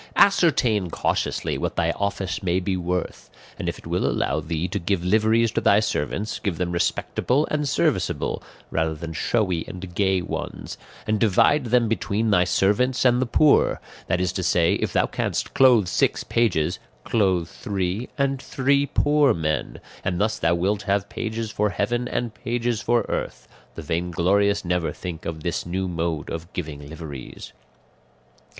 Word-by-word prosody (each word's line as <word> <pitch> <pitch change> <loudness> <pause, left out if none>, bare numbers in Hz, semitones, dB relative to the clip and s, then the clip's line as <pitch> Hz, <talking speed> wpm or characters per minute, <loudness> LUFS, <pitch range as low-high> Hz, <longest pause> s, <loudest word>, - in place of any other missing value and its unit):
"Ascertain 125 - +3
cautiously - - -1
what - - -2
thy 85 0 +1
office 100 -2 -2
may 90 -1 +1
be 95 +1 -1
worth; 90 0 -3 0.3
and - - -1
if - - -5
it - - -15
will - - 0
allow - - 0
thee 80 +1 -2
to 100 +3 -3
give 90 0 -1
liveries 110 +3 +3
to - - -1
thy 100 - +5
servants, 105 - -2
give 95 -6 -2
them 90 -1 -1
respectable 125 - 0
and 150 -2 0
serviceable, - - 0 0.3
rather 80 -1 0
than 80 +1 -6
showy 95 -3 0
and 90 -1 -8
gay 95 0 +2
ones, 90 - -5 0.3
and 110 -1 0
divide 120 +7 +3
them 120 0 +3
between 110 +1 0
thy 90 -3 +5
servants 105 +9 +2
and 125 0 +4
the 130 - 0
poor; 150 +4 +4 0.3
that 90 +1 +1
is 90 0 0
to 95 - -2
say, 85 -1 +3
if - - -1
thou - - +2
canst - - -2
clothe 125 -7 +5
six - - +1
pages, 100 -10 +1 0.2
clothe 95 -6 +1
three 100 +2 -3
and 135 -1 0
three 140 +1 +1
poor 145 -3 +3
men, 75 -3 -2 0.2
and 90 -2 -1
thus 110 +1 0
thou 85 +1 +2
wilt 100 +4 0
have 100 0 0
pages 110 -1 -4
for 105 0 +1
heaven 120 +6 -1
and 120 -3 -2
pages 120 -2 -2
for 120 -2 +1
earth; - - -4 0.3
the 80 - -7
vainglorious 90 +5 +1
never 90 -1 0
think 85 -3 -7
of 80 -2 -5
this 85 - -1
new 95 +2 -2
mode 85 -3 -3
of 80 +2 -6
giving 75 -4 -6
liveries. 75 -5 -9
95 Hz, 165 wpm, -24 LUFS, 85-115 Hz, 0.3 s, thy